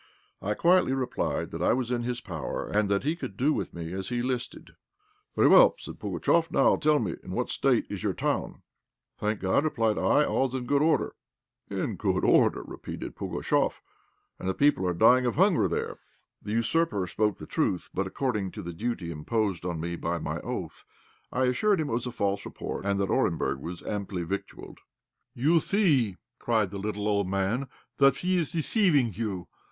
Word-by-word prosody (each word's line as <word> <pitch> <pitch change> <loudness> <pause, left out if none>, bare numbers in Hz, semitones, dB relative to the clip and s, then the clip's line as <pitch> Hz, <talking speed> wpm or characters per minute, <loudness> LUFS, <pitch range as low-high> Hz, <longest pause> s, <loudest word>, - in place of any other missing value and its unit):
I 105 +2 -1
quietly 175 -5 +4
replied 130 -2 -2
that - - -5
I - - +3
was 125 -1 -1
in 120 -1 0
his 120 0 -3
power, 80 -8 -4
and 105 -1 +1
that 100 0 +1
he 155 +4 0
could 100 - -7
do 145 +5 +2
with - - -3
me 85 0 -6
as 95 0 -4
he 120 -1 -1
listed. 125 -1 -4 0.6
"Very - - +5
well," - - +7
said - - -9
Pugatchéf; 165 0 +1
"now 135 - +4
tell 150 0 +3
me 100 - -2
in - - -8
what - - -1
state - - +2
is - - -5
your - - 0
town?" - - -2 0.6
"Thank 105 0 -1
God," 95 +9 +2
replied 115 -8 +1
I, 150 - +3
"all 135 - +1
is 130 - -7
in 125 -2 -3
good 140 +3 +2
order." 160 +1 +2 0.6
"In - - -2
good - - 0
order!" - - +4
repeated - - -7
Pugatchéf, - - -1 0.6
"and 95 - -3
the 95 - -1
people 140 -10 +3
are 90 - 0
dying 125 +6 +5
of 120 - -1
hunger 185 +1 +4
there." - - -3 0.4
The 105 - -5
usurper 115 - +1
spoke 105 +3 0
truth; 90 - -1
but, 95 0 -1
according 105 -3 -1
to - - -7
the 85 0 -6
duty 95 -3 -3
imposed 95 +3 -1
on 85 -2 -3
me 85 +2 -3
by 85 +1 -2
my - - -3
oath, - - -6 0.5
I 130 +1 +1
assured 190 +10 +2
him 155 -5 -2
it - - -1
was 120 +2 -1
a - - -4
false 100 -4 -1
report, 100 - -5
and 100 0 +1
that 100 -1 0
Orenburg 80 -5 +1
was 85 +5 -7
amply 100 -3 -3
victualled. 95 +4 -6 0.6
"You 155 +7 +3
see," 145 - +2 0.2
cried 110 -5 +1
the 100 - -5
little 105 +1 -3
old 100 -2 +1
man, 100 +8 -1 0.3
"that 140 -1 +6
he 185 0 +1
is 160 - -2
deceiving 160 - +2
you. 100 -4 -4
115 Hz, 190 wpm, -28 LUFS, 95-140 Hz, 0.6 s, well